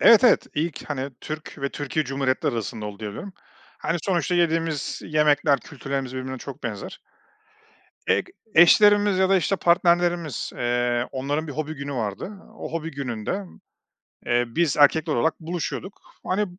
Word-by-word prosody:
Evet, 230 Hz, +2 st, +8 dB
evet, 245 Hz, -, +5 dB
ilk, 155 Hz, 0 st, -3 dB
hani, 140 Hz, -1 st, -2 dB
Türk 155 Hz, +1 st, -6 dB
ve 140 Hz, 0 st, -1 dB
Türkiye 145 Hz, +2 st, -2 dB
Cumhuriyetleri 135 Hz, 0 st, 0 dB
arasında 110 Hz, -1 st, -4 dB
oldu, 100 Hz, -1 st, -7 dB
diye 105 Hz, -1 st, -4 dB
biliyorum. 195 Hz, -, -8 dB, 0.5 s
Hani, 165 Hz, -, -1 dB
sonuçta 180 Hz, -1 st, +1 dB
yediğimiz 165 Hz, -3 st, 0 dB
yemekler, 150 Hz, -2 st, +3 dB
kültürlerimiz 135 Hz, -3 st, -5 dB
birbirine 130 Hz, 0 st, -4 dB
çok -, -, -9 dB
benzer. -, -, -5 dB, 1.1 s
Eg -, -, +2 dB, 0.3 s
eşlerimiz 205 Hz, +1 st, +6 dB
ya 190 Hz, -, +4 dB
da 195 Hz, -, +5 dB
işte 190 Hz, +2 st, +1 dB
partnerlerimiz, 170 Hz, -4 st, +2 dB
eee, 120 Hz, 0 st, +1 dB
onların 145 Hz, +4 st, -2 dB
bir 145 Hz, -, -5 dB
hobi 155 Hz, +2 st, -3 dB
günü 140 Hz, 0 st, -5 dB
vardı. 110 Hz, -, -3 dB, 0.3 s
O -, -, -7 dB
hobi 165 Hz, -1 st, -3 dB
gününde, 140 Hz, -, -3 dB, 0.8 s
eee, 120 Hz, 0 st, +2 dB
biz 150 Hz, +5 st, 0 dB
erkekler 150 Hz, +2 st, +4 dB
olarak 155 Hz, +7 st, +1 dB
buluşuyorduk, 175 Hz, +3 st, -5 dB, 0.2 s
hani, 205 Hz, +3 st, +1 dB
150 Hz, 150 wpm, -24 LUFS, 130-175 Hz, 1.1 s, Evet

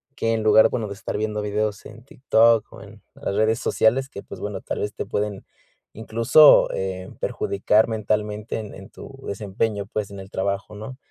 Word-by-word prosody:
Que 115 Hz, -, -1 dB
en 110 Hz, -, -1 dB
lugar 110 Hz, 0 st, +6 dB
bueno, 110 Hz, -3 st, -3 dB
de 100 Hz, -, -6 dB
estar -, -, -5 dB
viendo 105 Hz, 0 st, -2 dB
videos 105 Hz, 0 st, -2 dB
en 110 Hz, +2 st, -12 dB
TikTok 115 Hz, -4 st, +2 dB
o -, -, -12 dB
en -, -, -15 dB
las 100 Hz, -, -4 dB
redes 110 Hz, +2 st, +2 dB
sociales, 130 Hz, +4 st, +2 dB
que, 100 Hz, -, -9 dB
pues -, -, -10 dB
bueno, -, -, -4 dB
tal -, -, -4 dB
vez, 105 Hz, 0 st, -3 dB
te -, -, -5 dB
pueden, 105 Hz, -1 st, -3 dB, 0.5 s
incluso, 115 Hz, +7 st, +5 dB
eh, 95 Hz, -1 st, -4 dB
perjudicar 105 Hz, +3 st, +1 dB
mentalmente, 105 Hz, 0 st, -2 dB
en 105 Hz, -2 st, -8 dB
en 95 Hz, +1 st, -12 dB
tu 135 Hz, 0 st, -12 dB
desempeño, 100 Hz, 0 st, -3 dB
pues, 105 Hz, -2 st, -4 dB
en 100 Hz, -, -8 dB
el 95 Hz, -, -13 dB
trabajo, 100 Hz, +2 st, -3 dB
¿no? 110 Hz, +5 st, -8 dB
105 Hz, 190 wpm, -23 LUFS, 100-110 Hz, 0.5 s, lugar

